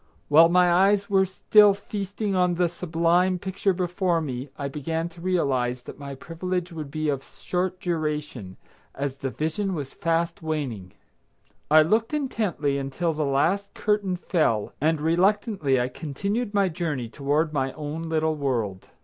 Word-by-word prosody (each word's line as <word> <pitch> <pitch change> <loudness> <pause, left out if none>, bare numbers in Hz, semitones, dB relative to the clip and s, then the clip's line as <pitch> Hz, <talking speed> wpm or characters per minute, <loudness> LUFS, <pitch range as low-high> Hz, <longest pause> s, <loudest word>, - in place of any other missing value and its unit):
While 160 +3 +7
my 180 0 +4
eyes 200 +2 +3
were 190 -1 +4
still 205 +2 +5
feasting 200 0 -4
on 180 -1 +2
the 175 0 +2
sublime 175 +2 +1
picture 190 +2 -1
before 180 -1 0
me 135 -3 -4
I 140 - -3
began 160 +4 -3
to 170 0 -15
realize 130 -9 0
that - - -10
my 140 -1 -7
privilege 175 +4 -4
would 155 -4 -6
be 155 +1 -2
of 140 -2 -1
short 180 +4 -3
duration, 150 - -3 0.4
as 140 -1 -3
the 135 0 -3
vision 170 +8 -2
was 140 -4 -5
fast 165 0 -1
waning. 135 - -4 0.8
I 155 +1 +7
looked 225 - +1
intently 185 - -1
until 150 +5 -2
the 150 0 -1
last 170 +9 +1
curtain 205 -3 0
fell, 155 - 0
and 160 +1 +2
reluctantly 175 - +2
I 125 - +1
continued 200 - -3
my 200 -2 +2
journey 155 -8 -3
toward 150 +5 0
my 135 -2 0
own 150 +1 -5
little 160 0 +1
world. 120 -10 -2
165 Hz, 155 wpm, -25 LUFS, 140-185 Hz, 0.8 s, While